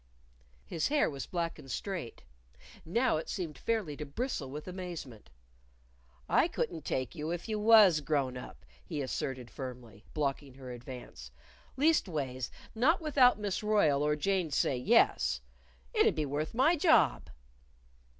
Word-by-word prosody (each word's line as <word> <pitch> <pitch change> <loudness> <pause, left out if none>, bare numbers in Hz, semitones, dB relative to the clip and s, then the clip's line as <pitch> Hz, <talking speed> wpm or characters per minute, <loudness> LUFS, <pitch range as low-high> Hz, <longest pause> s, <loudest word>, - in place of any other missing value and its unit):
His 155 - -1
hair 295 - +2
was 140 -2 -6
black 170 -2 -3
and 135 - -12
straight. 170 - -5 0.6
Now 230 +4 +1
it 160 - -5
seemed 165 -5 -4
fairly 205 -5 -2
to 150 - -4
bristle 150 - -3
with 150 +5 -7
amazement. 175 - -7 1.0
"I - - +4
couldn't 160 -4 -3
take 130 -1 -2
you 155 -2 -4
if 175 +4 -4
you 215 -1 -2
was 210 -7 +7
grown 140 -3 0
up," 65 - -10 0.2
he 145 - -4
asserted 130 -1 -4
firmly, 125 -6 -8
blocking 140 -2 -2
her 130 -2 -9
advance; 120 - -9 0.2
" - - -28
leastways 155 - +1 0.2
not 280 +11 +3
without 280 -8 +4
Miss 205 -3 -2
Royle 205 -10 +3
or 150 0 +2
Jane'd 180 -1 0
say 135 - +2
Yes. 95 - +3 0.5
It'd - - +4
be 155 -2 0
worth 150 +6 -3
my 285 +8 +4
job." 165 - +3
155 Hz, 145 wpm, -31 LUFS, 130-205 Hz, 1.0 s, was